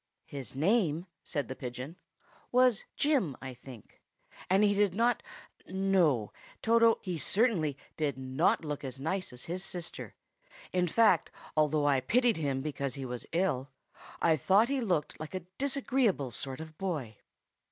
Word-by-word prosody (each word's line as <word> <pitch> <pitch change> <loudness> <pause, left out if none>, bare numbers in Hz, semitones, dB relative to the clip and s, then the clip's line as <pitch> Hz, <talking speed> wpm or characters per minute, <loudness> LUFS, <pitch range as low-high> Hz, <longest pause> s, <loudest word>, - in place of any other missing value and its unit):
"His 135 -4 -7
name," 170 - +2 0.2
said 145 -7 -2
the 130 - -5
pigeon, 125 +5 -6 0.6
"was 250 -3 +4
Jim, 260 - +1
I 130 0 -6
think. 125 -3 -13 0.5
And 190 +3 +4
he 205 -1 +4
did 200 -2 +2
not—no, 190 - 0 0.3
Toto, 230 0 +5
he 180 -4 -3
certainly 180 - +1 0.2
did 150 -3 0
not 130 +5 +1
look 150 -1 -4
as 130 -1 -6
nice 185 +5 -2
as 125 0 -10
his 180 +2 -4
sister. 175 -3 -6 0.6
In 180 -1 +2
fact, 210 -1 +4 0.3
although 150 -1 +3
I 140 -2 +4
pitied 235 - +2
him 140 -4 -1
because 140 -3 -3
he 135 -1 -5
was 125 -1 -6
ill, 155 -7 0 0.5
I 160 -2 +4
thought 200 - +4
he 275 -1 0
looked 175 -10 -1
like 155 +4 -6
a 185 - -2 0.2
disagreeable 260 - +1
sort 130 +3 -6
of 160 -1 -10
boy." 145 - -3
160 Hz, 150 wpm, -31 LUFS, 135-200 Hz, 0.6 s, Toto